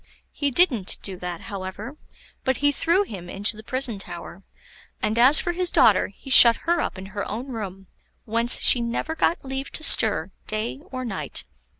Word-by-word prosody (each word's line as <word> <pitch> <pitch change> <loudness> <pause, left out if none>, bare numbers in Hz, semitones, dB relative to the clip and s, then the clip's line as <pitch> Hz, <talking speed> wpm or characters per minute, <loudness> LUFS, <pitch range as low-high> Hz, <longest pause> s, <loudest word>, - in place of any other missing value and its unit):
He 285 - -1
didn't 250 - +2
do 195 - -4
that, 175 -1 -6
however, 200 +6 -7 0.5
but 260 -1 0
he 290 0 +2
threw 340 +7 +3
him 185 - -9
into 205 +3 +2
the 215 - -10
prison 250 -2 -2
tower; 175 0 -8 0.6
and 215 +1 -1
as 265 +6 +6
for 350 - -1
his 355 0 -1
daughter, 205 - +4
he 265 +7 -12
shut 235 -2 +9
her 340 0 +1
up - - -4
in 190 - -8
her 205 -1 -3
own 240 +6 -5
room, 195 -4 -7 0.4
whence 230 +2 +1
she 245 - +3
never 235 +7 -3
got 330 -1 0
leave 270 +1 -5
to 315 - -3
stir - - +2 0.2
day 215 +5 -3
or 255 -1 -5
night. 185 - -3
235 Hz, 185 wpm, -23 LUFS, 195-275 Hz, 0.6 s, shut